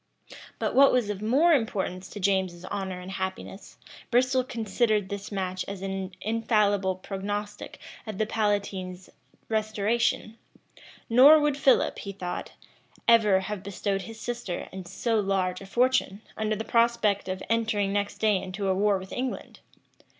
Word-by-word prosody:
But - - -2
what 275 +1 +7
was 240 -5 +1
of 200 -1 -6
more 280 +11 +4
importance 190 - -1
to 205 - -8
James's 185 -2 0
honor 190 -2 -4
and 180 +1 -8
happiness, 190 +1 -6 0.3
Bristol 255 +1 +3
considered 220 -4 0
this 200 +1 -6
match 185 -2 -2
as 195 -1 -6
an 190 -1 -4
infallible 210 -4 +1
prognostic 205 +2 -5 0.3
of 215 -3 -5
the 215 - +1
palatine's 200 -4 -2 0.4
restoration; 220 +1 0 0.7
nor 270 +7 +8
would 295 -1 +1
Philip, 275 -1 +3
he 200 - -6
thought, 180 -2 -5 0.5
ever 210 -5 +5
have 195 0 -5
bestowed 195 0 -2
his 225 +3 -9
sister 240 -6 -4
and 190 -2 -8
so 225 +4 0
large 190 -2 0
a 195 - -10
fortune, 240 -3 +1
under 215 0 -1
the 220 +2 -5
prospect 230 -4 +2
of 185 0 -4
entering 220 -3 0
next 205 0 -1
day 215 -2 +3
into 190 +1 -3
a - - +3
war 200 +1 +2
with 190 0 -10
England. 255 0 -4
205 Hz, 150 wpm, -27 LUFS, 190-225 Hz, 0.7 s, nor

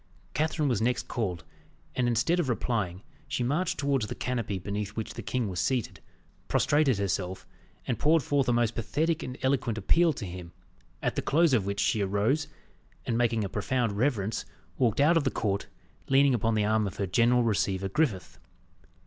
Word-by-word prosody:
Catherine 155 +2 0
was 120 -6 +1
next 125 +2 0
called, 95 -8 -3 0.5
and 125 -1 +1
instead 120 +10 +2
of 155 -7 0
replying, 105 -6 -1 0.2
she 125 - -1
marched 150 +9 0
towards 140 -6 0
the - - -5
canopy 115 -6 -2
beneath 100 +2 -4
which 110 - -4
the - - -6
king 125 -3 -1
was 90 -3 -4
seated, 125 -5 -1 0.5
prostrated 145 -4 +2
herself, 95 -1 -2 0.4
and 120 - -2
poured 160 0 +3
forth 140 0 +1
a - - +4
most 120 -1 +2
pathetic 155 +8 -1
and 125 +1 -6
eloquent 130 -4 +1
appeal 165 - +3
to 115 - -6
him, 90 -1 -8 0.5
at - - 0
the - - 0
close 160 0 +3
of 105 -6 +2
which 100 0 -2
she 110 - +2
arose, 105 +10 +1 0.6
and 115 - -1
making 115 -2 +1
a - - -1
profound 115 +4 -1
reverence, 110 -2 0 0.3
walked 120 -3 +1
out 160 +4 +5
of 160 - +2
the 135 - +2
court, 100 -5 -2 0.4
leaning 135 0 +5
upon 115 -1 +1
the 105 -1 +2
arm 110 0 +2
of 95 - -7
her 100 - 0
general 120 +6 +3
receiver, 100 -3 0
Griffith. 95 - -1
120 Hz, 185 wpm, -28 LUFS, 100-135 Hz, 0.6 s, out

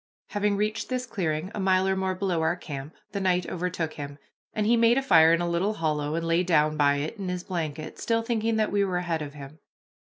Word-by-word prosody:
Having 205 -1 0
reached 215 +2 -1
this 255 -1 -2
clearing, 175 -6 -2
a - - -4
mile 190 0 +3
or 190 - +2
more 190 0 -1
below 180 -3 -1
our 160 +2 +1
camp, 145 -3 -7 0.2
the 200 - -3
night 180 -2 +1
overtook 175 -3 -3
him, 145 -1 -7 0.3
and 215 - -1
he 235 +3 +4
made 230 +1 +4
a - - +3
fire 165 -10 +6
in 170 +1 +3
a 175 - 0
little 175 +5 0
hollow, 150 -2 -1
and 165 0 -2
lay 165 +1 +2
down 155 -4 +2
by 145 -1 +3
it 150 +10 -3
in 190 -2 -3
his 180 -1 -3
blanket, 155 -4 -4
still 230 -1 0
thinking 225 -1 0
that 215 -1 +1
we 205 0 +2
were 185 -2 0
ahead 170 -3 -1
of 145 -1 -6
him. 145 +2 -10
180 Hz, 240 wpm, -27 LUFS, 155-200 Hz, 0.3 s, fire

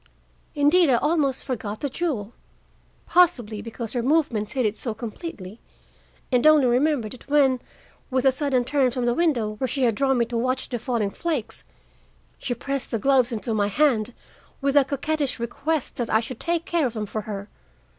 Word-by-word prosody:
Indeed, 295 +3 +4
I 255 - +5
almost 285 0 +1
forgot 215 -5 -4
the 285 - 0
jewel, 255 - -3 0.7
possibly 245 -13 +2
because 225 0 -6
her 245 - 0
movements 255 -6 +1
hid 255 -3 0
it 210 0 0
so 225 -1 -3
completely, 225 - -7 0.7
and 250 +3 +4
only 305 -3 +6
remembered 250 -2 +1
it 255 +2 -14
when, 275 -3 +4 0.5
with 260 0 0
a 265 - +6
sudden 265 -2 0
turn 270 0 +2
from 250 0 -2
the 240 - +2
window 255 -9 +1
where 260 - -1
she 265 +2 -1
had 235 -2 +3
drawn 270 +3 +1
me 235 - +2
to 235 0 -3
watch 255 +2 -1
the 240 - -3
falling 225 -4 -1
flakes, 310 -7 -3 0.8
she 250 -3 -3
pressed 275 +2 -3
the 230 - -1
gloves 255 +1 +3
into 225 0 -3
my 205 -2 +1
hand 235 -1 +1 0.4
with 275 -1 0
the 285 -1 +6
coquettish 285 +1 -1
request 280 +5 -2
that 240 -2 -2
I 220 - +4
should 235 +1 -6
take 335 -1 -1
care 335 -5 +1
of 235 - -8
them 215 -1 -2
for 215 +1 -4
her. 200 -1 -6
255 Hz, 185 wpm, -24 LUFS, 225-285 Hz, 0.8 s, only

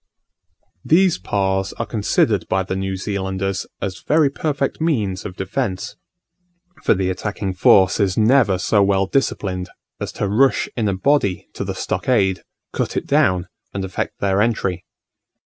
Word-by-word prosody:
These 180 - +3
Pas 95 0 -1
are - - -4
considered 105 -3 +1
by 95 0 +1
the 95 - -4
New 95 0 -2
Zealanders 95 -1 -3 0.2
as 95 -1 -4
very 150 -2 +3
perfect 140 -1 -2
means 105 - 0
of 90 - -6
defence: 95 0 -3 0.9
for - - +4
the 95 -1 0
attacking 100 +1 -3
force 95 +1 +4
is 95 -3 +1
never 110 -3 +4
so 100 +2 +2
well 100 0 +3
disciplined 95 -6 -1 0.3
as - - -4
to 105 - -2
rush 130 +7 +3
in 110 -3 0
a 100 - 0
body 100 - +1
to - - -4
the - - -4
stockade, 100 -7 0 0.3
cut - - -2
it - - -2
down, 105 -12 +2 0.3
and 95 -1 -2
effect 95 - -4
their 100 0 +1
entry. 105 -5 -1
100 Hz, 150 wpm, -20 LUFS, 95-120 Hz, 0.9 s, for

